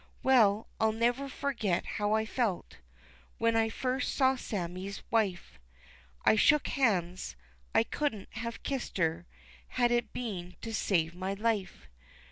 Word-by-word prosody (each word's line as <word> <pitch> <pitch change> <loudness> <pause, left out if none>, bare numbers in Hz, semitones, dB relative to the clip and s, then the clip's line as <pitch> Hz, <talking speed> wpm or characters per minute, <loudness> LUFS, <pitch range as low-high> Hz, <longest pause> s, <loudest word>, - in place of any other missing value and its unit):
Well, 225 -5 +5
I'll 220 0 +3
never 240 +5 +1
forget 240 -10 -1
how 210 0 -1
I 220 0 +2
felt 220 -5 -2 0.6
When 230 0 +2
I 225 0 +3
first 255 +3 -1
saw 265 -1 +4
Sammie's 190 -4 -5
wife, 195 - 0 0.7
I - - +6
shook 300 +7 +4
hands 185 - 0 0.4
I - - +6
couldn't 230 -5 -2
have 230 +1 -5
kissed 270 -6 -3
her 165 0 0 0.4
Had 240 -1 +1
it 240 0 +1
been 185 -7 -5
to 225 - -5
save 170 -6 +1
my 185 +2 -3
life. 205 - -2
220 Hz, 135 wpm, -31 LUFS, 185-240 Hz, 0.7 s, I